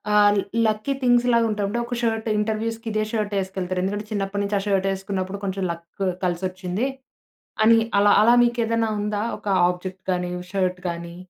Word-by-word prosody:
ఆహ్, 205 Hz, 0 st, +5 dB, 0.3 s
lucky 215 Hz, +5 st, 0 dB
things 245 Hz, -1 st, +4 dB
లాగా 235 Hz, 0 st, +4 dB
ఉంటాయి. 210 Hz, -2 st, -1 dB
అంటే 235 Hz, +4 st, -1 dB
ఒక 245 Hz, +1 st, -4 dB
షర్ట్ 225 Hz, -1 st, -1 dB
ఇంటర్‌వ్యూస్‌కి 225 Hz, +2 st, -2 dB
ఇదే 215 Hz, 0 st, 0 dB
షర్ట్ 210 Hz, -2 st, -2 dB
ఎసుకెళ్తారు. 185 Hz, -1 st, -3 dB
ఎందుకంటే 205 Hz, +2 st, -2 dB
చిన్నప్పటి 200 Hz, -1 st, -2 dB
నుంచి 200 Hz, +1 st, -1 dB
ఆ -, -, -4 dB
షర్ట్ 195 Hz, -1 st, +1 dB
వేసుకున్నప్పుడు 195 Hz, 0 st, -3 dB
కొంచెం 195 Hz, 0 st, -2 dB
లక్ 170 Hz, 0 st, -7 dB, 0.4 s
కలిసొచ్చింది. 185 Hz, +4 st, -2 dB, 0.8 s
అని 230 Hz, +1 st, +7 dB, 0.2 s
అలా 205 Hz, 0 st, +5 dB
అలా 230 Hz, +3 st, +6 dB
మీకు 240 Hz, 0 st, 0 dB
ఏదైనా 225 Hz, 0 st, 0 dB
ఉందా, 210 Hz, 0 st, -1 dB, 0.2 s
ఒక -, -, -12 dB, 0.2 s
ఆబ్జెక్ట్ 185 Hz, +1 st, -4 dB
గానీ 180 Hz, -1 st, -1 dB, 0.2 s
షర్ట్ 185 Hz, -2 st, 0 dB
గానీ? 170 Hz, 0 st, -5 dB
205 Hz, 170 wpm, -23 LUFS, 185-220 Hz, 0.8 s, అని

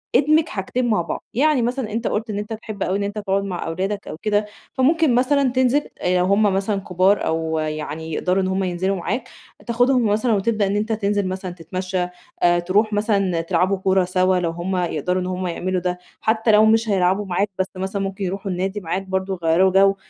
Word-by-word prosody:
ادمج 305 Hz, +4 st, +4 dB
حاجتين 240 Hz, +5 st, -2 dB
مع 210 Hz, -5 st, +2 dB
بعض. 170 Hz, -, -5 dB
يعني 285 Hz, 0 st, +3 dB
مثلًا 245 Hz, -1 st, -2 dB
أنتَ 225 Hz, +2 st, -2 dB
قُلت 220 Hz, +1 st, -2 dB
إن 205 Hz, -, -3 dB
أنتَ 210 Hz, +2 st, -5 dB
بتحب 215 Hz, -2 st, -5 dB
أوي 190 Hz, -, 0 dB
إن 200 Hz, -, -2 dB
أنتَ 200 Hz, +1 st, -4 dB
تقعد 195 Hz, -1 st, 0 dB
مع 185 Hz, -3 st, -4 dB
أولادك 195 Hz, +5 st, -3 dB
أو -, -, -6 dB
كده، 210 Hz, -1 st, +1 dB, 0.3 s
فممكن 290 Hz, 0 st, +3 dB
مثلًا 265 Hz, +1 st, +2 dB
تنزل، 260 Hz, +3 st, +3 dB, 0.2 s
آآ 180 Hz, 0 st, +2 dB
لو 180 Hz, -, +2 dB
هُم 200 Hz, +3 st, +3 dB
مثلًا 200 Hz, 0 st, +1 dB
كبار 185 Hz, +2 st, +2 dB
أو 160 Hz, 0 st, -1 dB
يعني 155 Hz, +1 st, -4 dB
يقدَروا 185 Hz, +4 st, +1 dB
إن -, -, 0 dB
هُم 190 Hz, +1 st, 0 dB
ينزِلوا 185 Hz, +2 st, -1 dB
معاك، 230 Hz, +8 st, -3 dB, 0.4 s
تاخدهُم 245 Hz, +1 st, +3 dB
مثلًا 220 Hz, +3 st, +2 dB
وتبدأ 210 Hz, 0 st, +1 dB
إن 195 Hz, -, -1 dB
أنتَ 215 Hz, +2 st, -1 dB
تنزل 205 Hz, -2 st, 0 dB
مثلًا 185 Hz, 0 st, -4 dB
تتمشَّى، 180 Hz, +1 st, -3 dB, 0.4 s
آآ، 175 Hz, 0 st, +4 dB
ترُوح 205 Hz, +5 st, +1 dB
مثلًا 200 Hz, -5 st, +1 dB
تلعبوا 180 Hz, +3 st, +1 dB
كورة 190 Hz, -1 st, +2 dB
سوا، 185 Hz, +1 st, +2 dB
لو 170 Hz, -2 st, -1 dB
هُم 175 Hz, +3 st, -3 dB
يقدَروا 180 Hz, +1 st, -1 dB
إن 180 Hz, -, -3 dB
هُم 185 Hz, 0 st, -3 dB
يعملوا 180 Hz, +1 st, -2 dB
ده. 180 Hz, 0 st, -2 dB, 0.2 s
حتى 220 Hz, +1 st, +2 dB
لو 215 Hz, +1 st, +6 dB
مش 225 Hz, +1 st, +3 dB
هيلعبوا 190 Hz, +1 st, +2 dB
معاك، 195 Hz, +2 st, 0 dB
بس 190 Hz, -, +1 dB
مثلًا 190 Hz, +2 st, -3 dB
ممكن 195 Hz, 0 st, -4 dB
يرُوحوا 195 Hz, +2 st, -3 dB
النادي 190 Hz, +3 st, -2 dB
معاك 180 Hz, 0 st, -3 dB
برضه، 190 Hz, 0 st, -3 dB
يغيِّروا 170 Hz, +4 st, +4 dB
جو. 195 Hz, +1 st, +5 dB
195 Hz, 205 wpm, -21 LUFS, 180-215 Hz, 0.4 s, لو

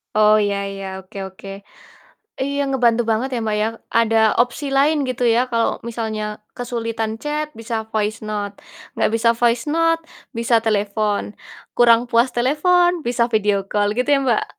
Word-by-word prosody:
Oh 215 Hz, 0 st, +5 dB
iya 200 Hz, 0 st, -1 dB, 0.2 s
iya, 195 Hz, 0 st, -7 dB, 0.2 s
oke 190 Hz, +1 st, -14 dB
oke, 190 Hz, +1 st, -13 dB, 1.0 s
iya 280 Hz, +1 st, -1 dB
ngebantu 240 Hz, -3 st, +2 dB
banget 230 Hz, +5 st, 0 dB
ya, -, -, -1 dB
Mbak, 215 Hz, -1 st, 0 dB
ya, -, -, +2 dB, 0.3 s
ada 225 Hz, 0 st, +1 dB, 0.2 s
opsi 245 Hz, +4 st, 0 dB
lain 300 Hz, +3 st, +4 dB
gitu, 250 Hz, 0 st, -3 dB
ya 240 Hz, -, +3 dB
kalau 230 Hz, 0 st, +2 dB, 0.2 s
misalnya 220 Hz, -2 st, -3 dB, 0.3 s
kesulitan 230 Hz, -2 st, -3 dB
chat 300 Hz, +1 st, -2 dB
bisa 230 Hz, 0 st, -3 dB, 0.2 s
voice 215 Hz, 0 st, -1 dB
note 205 Hz, -1 st, -3 dB, 0.4 s
nggak -, -, +2 dB
bisa 230 Hz, +1 st, +2 dB
voice 235 Hz, 0 st, +2 dB
note 330 Hz, 0 st, +2 dB, 0.4 s
bisa 235 Hz, 0 st, +1 dB
telepon, 210 Hz, -1 st, 0 dB, 0.5 s
kurang 235 Hz, -1 st, +6 dB
puas 235 Hz, +1 st, +3 dB
telepon, 350 Hz, +8 st, +3 dB, 0.2 s
bisa 240 Hz, -1 st, +1 dB
video 210 Hz, -2 st, +2 dB
call 205 Hz, 0 st, +1 dB
gitu 250 Hz, +3 st, -1 dB
ya, 275 Hz, -, +3 dB
Mbak? 235 Hz, -4 st, +2 dB
230 Hz, 155 wpm, -20 LUFS, 215-250 Hz, 1.0 s, kurang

